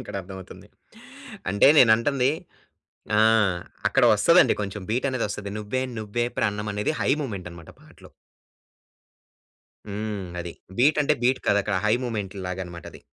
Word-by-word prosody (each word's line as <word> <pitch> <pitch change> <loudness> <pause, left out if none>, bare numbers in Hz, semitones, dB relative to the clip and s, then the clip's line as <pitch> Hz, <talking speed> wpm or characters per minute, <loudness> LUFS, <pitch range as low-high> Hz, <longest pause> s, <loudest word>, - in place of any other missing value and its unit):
ఇక్కడ 125 - -9
అర్థమవుతుంది. 95 0 -11 0.8
అంటే 100 +6 +5
నేనంటుంది 125 +3 +4 0.9
ఆ! - - +5 0.7
అక్కడ - - +2
వస్తదండి - - +5
కొంచెం 100 0 -5
బీట్ 120 +5 0
అనేదొస్తది 105 -5 -3
'నువ్వే 105 +5 -3 0.2
నువ్వే 110 +2 -2
ప్రాణం' 105 0 -1
అనేది 105 +7 -1
హై - - 0
మూమెంట్ 100 -10 -5
అన్నమాట 85 -2 -12
పాటలో. - - -17 1.8
హ్మ్. 105 0 -4 0.2
అది. 85 0 -6 0.3
బీట్ 145 +5 +4
అంటే 150 +1 +2
బీట్ 130 +2 +2
కాదక్కడ 100 0 +1
హై 105 - +4
మూమెంట్ 105 -5 -4
లాగన్నమాట 90 -2 -6
అది. - - -13
105 Hz, 130 wpm, -24 LUFS, 100-120 Hz, 1.8 s, అంటే